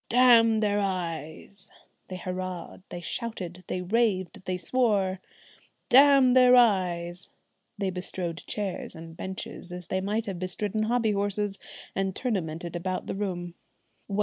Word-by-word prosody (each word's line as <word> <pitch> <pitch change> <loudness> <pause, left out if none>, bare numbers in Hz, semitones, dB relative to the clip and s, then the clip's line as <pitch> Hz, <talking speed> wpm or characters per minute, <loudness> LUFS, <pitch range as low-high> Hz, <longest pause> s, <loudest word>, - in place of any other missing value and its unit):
"Damn 230 -3 +6
their 205 -1 +2
eyes!" 185 0 -4 0.4
they 185 - -6
hurrahed, 185 -1 -5
they 175 - -6
shouted, 185 -2 -4
they 180 - -2
raved, 200 -2 0
they 185 0 -1
swore. 200 -4 +1 0.7
"Damn 270 -1 +7
their 250 -1 +7
eyes!" 180 -7 +2 0.5
they 195 -2 -1
bestrode 180 -2 -4
chairs 200 -3 -3
and 165 0 -10
benches, 190 0 -6
as 180 -1 -8
they 190 - 0
might 210 +4 -1
have 190 -4 -4
bestridden 205 +4 -1
hobby 230 -1 +2
horses, 205 0 -1 0.4
and 190 -1 -1
tournamented 175 -8 -3
about 185 +2 -3
the - - -3
room. 180 -4 -3
190 Hz, 130 wpm, -27 LUFS, 180-215 Hz, 0.7 s, Damn